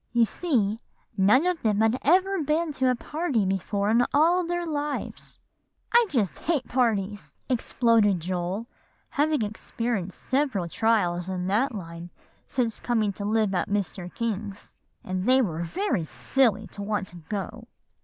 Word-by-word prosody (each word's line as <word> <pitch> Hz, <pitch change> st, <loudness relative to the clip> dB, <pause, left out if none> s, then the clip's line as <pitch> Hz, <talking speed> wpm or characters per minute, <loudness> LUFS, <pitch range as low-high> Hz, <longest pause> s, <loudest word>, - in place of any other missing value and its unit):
"You 235 Hz, -1 st, +5 dB
see, 225 Hz, -, 0 dB, 0.4 s
none 210 Hz, -, +4 dB
of 360 Hz, -2 st, 0 dB
them 210 Hz, -2 st, +1 dB
had 225 Hz, +3 st, +3 dB
ever 375 Hz, +4 st, +3 dB
been 310 Hz, +2 st, 0 dB
to 260 Hz, -2 st, +1 dB
a 250 Hz, -, +2 dB
party 290 Hz, -, -1 dB
before 200 Hz, +2 st, 0 dB
in 235 Hz, +2 st, +5 dB
all 340 Hz, +5 st, +4 dB
their 350 Hz, 0 st, -2 dB
lives." 295 Hz, -2 st, -4 dB, 0.6 s
"I 475 Hz, -1 st, +6 dB
just 220 Hz, -, 0 dB
hate 305 Hz, -6 st, -1 dB
parties!" 210 Hz, -5 st, -1 dB
exploded 230 Hz, -5 st, +3 dB
Joel, 180 Hz, +5 st, -3 dB, 0.5 s
having 300 Hz, -3 st, +1 dB
experienced 215 Hz, -2 st, -3 dB
several 260 Hz, -10 st, 0 dB
trials 180 Hz, -3 st, +1 dB
in 180 Hz, -1 st, -2 dB
that 230 Hz, +5 st, +1 dB
line 170 Hz, -2 st, -7 dB, 0.4 s
since 240 Hz, -4 st, -1 dB
coming 220 Hz, -4 st, 0 dB
to 200 Hz, -, -6 dB
live 215 Hz, -1 st, +1 dB
at 180 Hz, 0 st, 0 dB
Mr. 190 Hz, -3 st, -2 dB
King's; 210 Hz, -3 st, -4 dB, 0.3 s
"and 185 Hz, 0 st, -3 dB
they 260 Hz, +2 st, +5 dB
were 170 Hz, -10 st, 0 dB
very 310 Hz, -, -1 dB
silly 220 Hz, -, +1 dB
to 200 Hz, -, -8 dB
want 205 Hz, -1 st, -2 dB
to 175 Hz, -, -12 dB
go." 200 Hz, +7 st, -6 dB
220 Hz, 150 wpm, -26 LUFS, 195-270 Hz, 0.6 s, I